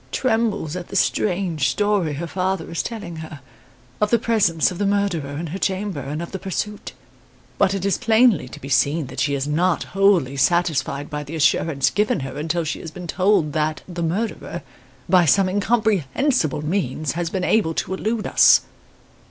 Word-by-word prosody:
Trembles 220 - 0
at 180 -1 -6
the - - -8
strange 175 - +1
story 205 -1 0
her 155 +4 -4
father 185 0 -2
is 170 - -1
telling 200 -8 -6
her, 160 -2 -8 0.6
of 210 - +3
the 235 - +4
presence 205 -8 +2
of 180 - -7
the 205 - +1
murderer 175 -9 -1
in 165 - -4
her 190 - -4
chamber, 195 -4 -2
and 145 +4 -4
of 170 - -8
the 190 - -5
pursuit. 205 +2 -4 0.7
But 195 - +3
it 195 -1 -3
is 200 - +1
plainly 225 - +3
to - - -10
be 135 - -9
seen 145 +2 +2
that 130 +1 -8
she 145 -1 +1
is 135 +1 -2
not 170 +3 +1
wholly 185 -9 +3
satisfied 150 -2 +1
by 150 0 -3
the 145 +3 -8
assurance 145 -2 +2
given 210 -7 0
her 135 0 -6
until 165 +3 -1
she 155 - -3
had 165 - -8
been 180 - -7
told 180 -3 +1
that 155 0 -1
the 175 -2 -6
murderer, 190 +8 -3 0.4
by 180 -1 +5
some 190 +6 +4
incomprehensible 205 - 0
means, 155 -4 -1
had 170 +2 -3
been 190 -2 -2
able 180 -6 +2
to - - -2
elude 215 +3 -2
us. - - +6
175 Hz, 185 wpm, -22 LUFS, 155-200 Hz, 0.7 s, us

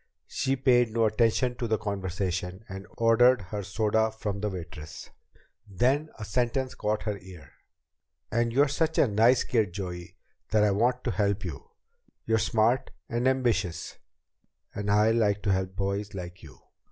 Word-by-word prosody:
She 135 0 -1
paid 125 -2 +3
no 115 0 +2
attention 115 +3 +2
to 120 - -2
the 110 -1 +1
conversation, 95 -1 -3
and 95 -1 -8
ordered 120 +2 +5
her 100 +3 -5
soda 110 +2 +1
from 105 -2 -4
the 105 +1 -1
waitress. 80 -5 -8 0.6
Then 130 - +1
a 110 - -6
sentence 125 +4 -1
caught 105 -3 -2
her 105 -2 -3
ear. 90 -6 -13 0.4
"... 70 +4 -54
and 115 +1 +1
you're 140 +5 +4
such 160 +3 -1
a - - +6
nice 115 +4 +4
kid, 110 -7 0
Joey, 90 -3 -6 0.3
that 110 -1 +3
I 105 - +3
want 120 +5 +1
to 120 - -1
help 100 -2 0
you. 80 -6 -7 0.6
You're 110 0 +2
smart 110 +3 +2 0.2
and 120 +1 0
ambitious, 120 -10 0 0.7
and 100 0 -4
I 105 +2 +4
like 105 -3 +1
to 100 - +2
help 95 0 -1
boys 100 +2 -2
like 90 -2 -7
you." 70 -7 -14
105 Hz, 165 wpm, -27 LUFS, 95-120 Hz, 0.7 s, a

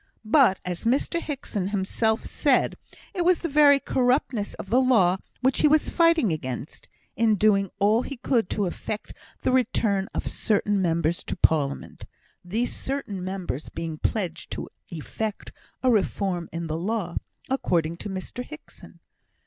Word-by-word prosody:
But, 230 -4 +5
as 180 -1 -4
Mr 275 +8 +1
Hickson 250 - -3
himself 210 +3 0
said, - - +2 0.4
it 355 - 0
was 360 0 +3
the - - +1
very 290 -2 +6
corruptness 250 -5 0
of 190 - -8
the 255 +3 +5
law 195 -9 +4 0.2
which 260 +1 +2
he - - +6
was 305 +1 +3
fighting 330 - +4
against, 130 -2 -6 0.3
in 225 -2 +3
doing 200 -1 +3
all 210 +4 +3
he 280 +1 -6
could 235 -5 +1
to 205 - 0
effect 210 +4 -5 0.3
the - - +2
return 215 -6 +1
of - - -2
certain 205 -2 +1
members 170 -1 0
to - - -3
Parliament; 140 -3 0 0.4
these 220 +7 -2
certain 235 -9 -4
members 185 -6 -4
being 160 -2 -5
pledged 180 -7 -2
to - - -5 0.2
effect 200 +6 -5 0.3
a 255 - +4
reform 190 -5 0
in 165 +1 -4
the 160 0 -3
law, 190 -2 -2 0.3
according 170 -11 0
to 205 - -6
Mr 190 +6 -5
Hickson. 310 +4 -13
210 Hz, 150 wpm, -25 LUFS, 180-255 Hz, 0.4 s, very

